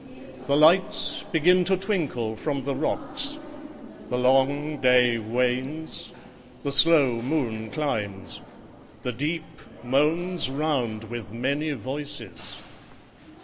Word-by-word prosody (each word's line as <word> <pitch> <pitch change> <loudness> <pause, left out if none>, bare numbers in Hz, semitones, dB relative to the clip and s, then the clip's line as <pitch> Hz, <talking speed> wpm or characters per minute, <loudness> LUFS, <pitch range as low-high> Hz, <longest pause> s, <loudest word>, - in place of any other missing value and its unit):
The 140 - +3
lights 170 +5 +3
begin 180 +3 +4
to 190 0 +2
twinkle 155 - -2
from 140 +3 -3
the 140 +1 -1
rocks: 285 - -3 0.7
The 125 - -1
long 135 +4 +2
day 125 -2 +4
wanes: 125 +7 -2 0.5
the 140 - -1
slow 140 -7 +4
moon 115 -5 -2
climbs: 105 -11 -3 0.6
the 125 - -1
deep 155 +5 -4 0.2
Moans 155 +6 +1
round 135 -7 -1
with 110 -3 -7
many 140 +6 -1
voices. 130 - -6
140 Hz, 105 wpm, -25 LUFS, 120-155 Hz, 0.7 s, begin